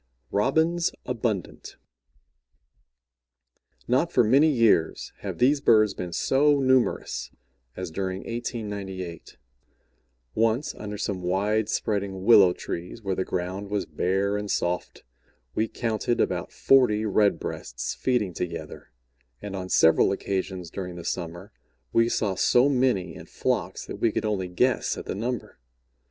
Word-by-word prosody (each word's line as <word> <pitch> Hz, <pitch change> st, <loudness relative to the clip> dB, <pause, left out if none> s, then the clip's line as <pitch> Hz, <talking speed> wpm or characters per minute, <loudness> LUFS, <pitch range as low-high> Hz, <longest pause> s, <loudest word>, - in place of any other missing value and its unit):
ROBINS 160 Hz, +10 st, +2 dB
ABUNDANT 115 Hz, -6 st, -3 dB, 2.1 s
Not 135 Hz, +8 st, +2 dB
for 125 Hz, -, +4 dB
many 135 Hz, +8 st, +5 dB
years 115 Hz, -, +2 dB
have -, -, -5 dB
these 140 Hz, +3 st, +3 dB
birds 110 Hz, -5 st, +4 dB
been 90 Hz, -2 st, -6 dB
so 145 Hz, -, +3 dB
numerous 125 Hz, -, +1 dB, 0.5 s
as 90 Hz, -2 st, -5 dB
during 95 Hz, +2 st, -3 dB
1898. 100 Hz, -, -6 dB, 1.0 s
Once, 115 Hz, +6 st, +1 dB
under 105 Hz, 0 st, -7 dB
some 100 Hz, -2 st, -3 dB
wide 100 Hz, +4 st, 0 dB
spreading 100 Hz, -4 st, -2 dB
willow 100 Hz, -4 st, +7 dB
trees, 90 Hz, +5 st, -6 dB
where 95 Hz, -1 st, -1 dB
the 95 Hz, -, -1 dB
ground 95 Hz, +3 st, -4 dB
was 105 Hz, -1 st, -1 dB
bare 100 Hz, +3 st, 0 dB
and 105 Hz, 0 st, -5 dB
soft, 90 Hz, -2 st, -2 dB, 0.5 s
we 110 Hz, -, 0 dB
counted 115 Hz, 0 st, -1 dB
about -, -, -1 dB
forty 115 Hz, -5 st, +3 dB
Red 105 Hz, -1 st, +2 dB
breasts -, -, -5 dB
feeding 120 Hz, -8 st, 0 dB
together, 85 Hz, -2 st, -6 dB, 0.5 s
and 100 Hz, +5 st, -6 dB
on 95 Hz, -1 st, -5 dB
several 80 Hz, -2 st, +5 dB
occasions 95 Hz, -3 st, -3 dB
during 90 Hz, -2 st, -6 dB
the 85 Hz, -, -8 dB
summer 85 Hz, +3 st, -5 dB, 0.4 s
we 115 Hz, 0 st, +4 dB
saw 105 Hz, -4 st, 0 dB
so 120 Hz, +7 st, +4 dB
many 125 Hz, -11 st, +1 dB
in -, -, -11 dB
flocks, -, -, -2 dB
that -, -, -7 dB
we 115 Hz, -, +2 dB
could -, -, -2 dB
only 100 Hz, -4 st, -1 dB
guess 120 Hz, +8 st, +1 dB
at -, -, -7 dB
the -, -, -3 dB
number. 120 Hz, -, -4 dB
105 Hz, 135 wpm, -26 LUFS, 95-120 Hz, 2.1 s, willow